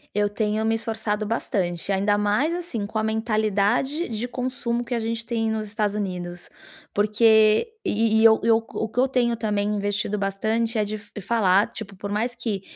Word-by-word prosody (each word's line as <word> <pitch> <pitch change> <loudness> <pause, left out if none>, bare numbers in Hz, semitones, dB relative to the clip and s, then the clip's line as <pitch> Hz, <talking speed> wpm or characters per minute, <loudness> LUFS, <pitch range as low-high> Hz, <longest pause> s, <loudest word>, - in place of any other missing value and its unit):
Eu 205 0 +2
tenho 210 +1 -1
me 225 0 +2
esforçado 220 -2 -2
bastante, 195 -5 -2
ainda 205 +2 +2
mais, 210 +11 +1
assim, 340 -12 -4
com 220 +1 -3
a - - -1
mentalidade 220 - 0
de 225 +2 -3
consumo 245 -1 -2
que 240 - -4
a 235 - 0
gente 230 +1 -3
tem 225 -1 -1
nos 220 -1 -2
Estados 210 -1 -1
Unidos, 180 -3 -4 0.4
porque 215 - +4
e 220 +1 +2
e - - +4
eu 220 -1 +7
eu 225 0 +5
o 225 -1 -4
que 230 +3 -4
eu 265 - +4
tenho 240 -2 +1
também 210 -2 -1
investido 205 0 -1
bastante 220 +4 -1
é 210 - +2
de 215 +1 -4
f 205 0 -11
falar, 200 -1 +2
tipo: 200 -3 -8
por 200 +2 -6
mais 235 +4 -1
que 220 -5 -3
220 Hz, 190 wpm, -24 LUFS, 205-230 Hz, 0.4 s, eu